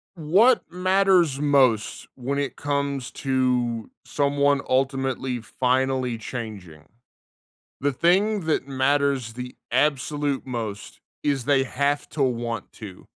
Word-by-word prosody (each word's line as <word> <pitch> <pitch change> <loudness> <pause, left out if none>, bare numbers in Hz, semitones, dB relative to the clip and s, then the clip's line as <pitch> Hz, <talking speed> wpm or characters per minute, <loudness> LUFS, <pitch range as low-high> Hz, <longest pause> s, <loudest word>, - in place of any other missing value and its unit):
What 195 +11 +4
matters 180 -5 +2
most 130 -7 +2
when 135 +3 -3
it 140 -1 -2
comes 140 -3 -2
to 125 -4 0
someone 140 0 +1
ultimately 130 -1 0
finally 130 0 0
changing? 105 -10 -7 1.0
The 140 0 +1
thing 195 +8 +2
that 155 -4 -1
matters 135 -3 0
the 125 0 -7 0.2
absolute 145 +1 0
most 115 -5 -6 0.2
is 140 -4 0
they 135 -1 +3
have 140 +2 -1
to 150 - -2
want 120 -2 -2
to. 100 -4 -11
135 Hz, 110 wpm, -24 LUFS, 125-145 Hz, 1.0 s, What